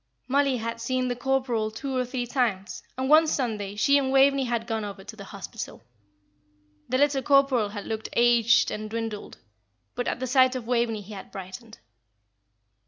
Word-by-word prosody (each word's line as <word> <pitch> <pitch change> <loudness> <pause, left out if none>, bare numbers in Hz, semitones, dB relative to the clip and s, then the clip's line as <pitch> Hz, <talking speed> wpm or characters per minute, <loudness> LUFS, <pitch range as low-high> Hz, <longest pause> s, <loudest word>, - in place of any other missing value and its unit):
Mollie 275 0 +2
had 230 0 -4
seen 255 +2 0
the 245 - -1
corporal 250 -3 0
two 265 +5 -5
or 255 - +1
three 250 0 -3
times, 230 -6 -1 0.2
and 260 0 -1
one 310 +3 +6
Sunday 215 -9 -2
she 280 +7 +4
and 265 -1 -1
Waveney 275 0 +4
had 235 -2 -1
gone 225 -2 -2
over 200 -1 -7
to 205 +2 -10
the 200 -2 -10
Hospital. 195 - -8 1.1
The 255 - +1
little 280 -1 +2
corporal 275 -5 +3
had 205 -1 -7
looked 220 -1 -4
aged 235 -1 +4
and 215 0 -5
dwindled; 225 -2 -5 0.6
but 245 - -3
at - - -2
the 255 - -2
sight 255 0 +4
of 250 -3 -4
Waveney 235 -3 0
he 205 +2 -11
had 195 - -9
brightened. 195 +4 -9
240 Hz, 175 wpm, -26 LUFS, 215-265 Hz, 1.1 s, one